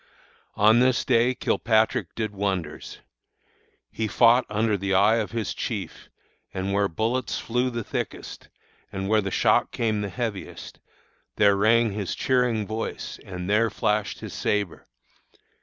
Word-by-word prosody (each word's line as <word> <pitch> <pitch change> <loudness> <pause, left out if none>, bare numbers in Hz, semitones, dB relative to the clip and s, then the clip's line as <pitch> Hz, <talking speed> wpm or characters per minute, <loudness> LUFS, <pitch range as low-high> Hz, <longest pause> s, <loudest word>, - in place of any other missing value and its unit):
"On 110 +3 +5
this 125 -1 +2
day 125 0 +3
Kilpatrick 110 -3 +1
did 110 -2 -2
wonders. 95 -6 -4 0.9
He 110 - -2
fought 120 +4 +4
under 105 0 +1
the 100 0 -1
eye 105 +4 +4
of 110 -2 -2
his 115 -3 -3
chief, - - -5 0.4
and 95 +1 -3
where 100 0 +2
bullets 115 +8 -2
flew 125 +2 -1
the 120 -2 -4
thickest, - - -6 0.4
and 95 +1 -4
where 110 0 +4
the 100 - -3
shock - - +2
came 110 -3 -1
the 100 - -3
heaviest, 110 -1 -6 0.6
there 100 -1 +4
rang 110 +2 +3
his 100 -2 -3
cheering 125 -5 +1
voice 110 +2 -5
and 90 -1 -6
there 105 +3 +3
flashed 105 -1 -1
his - - -7
sabre. 105 -4 -2
110 Hz, 140 wpm, -25 LUFS, 100-115 Hz, 0.9 s, On